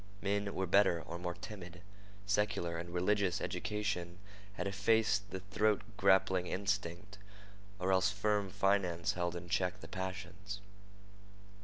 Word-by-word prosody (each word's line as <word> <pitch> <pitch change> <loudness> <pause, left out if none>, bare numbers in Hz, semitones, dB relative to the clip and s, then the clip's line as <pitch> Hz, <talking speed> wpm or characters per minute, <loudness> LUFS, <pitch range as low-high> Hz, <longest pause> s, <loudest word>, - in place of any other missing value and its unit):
Men 100 0 -1
were 95 - 0
better, 95 -1 +4
or 85 +1 -6
more 90 0 -3
timid. 90 -4 -9 0.4
Secular 100 -4 +1
and 85 +1 -6
religious 90 +1 +1
education 90 -1 -2 0.4
had 100 - -3
effaced 105 +1 +2
the 95 - -5
throat 105 +2 +1
grappling 95 -3 +4
instinct, 100 +1 -2 0.6
or 95 0 0
else 95 0 +4
firm 105 0 +1
finance 95 -4 +1
held 85 -1 -1
in 85 0 -6
check 90 0 0
the - - -9
passions. 95 +1 -5
95 Hz, 130 wpm, -35 LUFS, 90-100 Hz, 0.6 s, better